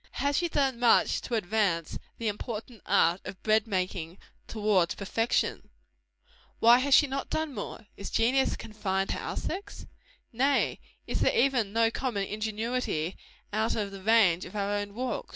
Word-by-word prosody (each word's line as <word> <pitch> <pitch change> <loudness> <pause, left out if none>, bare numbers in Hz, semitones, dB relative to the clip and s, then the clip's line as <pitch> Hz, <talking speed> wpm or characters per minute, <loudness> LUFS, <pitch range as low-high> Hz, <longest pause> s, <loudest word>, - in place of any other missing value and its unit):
Has 285 0 0
she 345 -1 +1
done 270 -5 0
much 240 -1 +4
to 240 - -3
advance 195 -5 0 0.2
the 230 - -3
important 215 +1 -5
art 170 +3 +3
of 190 - -9
bread 220 +1 +3
making 185 -3 -3 0.3
towards 205 -5 +1
perfection? 225 +4 -1 0.9
Why 235 +2 +6
has 275 +1 +4
she 295 - +6
not 275 0 -4
done 315 -2 -2
more? 220 0 -7
Is 200 - -6
genius 260 +4 +2
confined 195 -3 -2
to - - -2
our - - -5
sex? 405 +2 -5 0.5
Nay, 270 +4 +1 0.3
is - - -2
there - - +2
even 245 -6 +2
no 225 +1 +2
common 230 -6 -2
ingenuity 215 -5 -2 0.4
out 220 +2 +1
of 205 -2 -2
the 195 -1 -9
range 200 -5 +4
of - - -10
our 200 0 -1
own 205 0 -3
walks? 255 +2 -3
220 Hz, 160 wpm, -28 LUFS, 200-250 Hz, 0.9 s, Why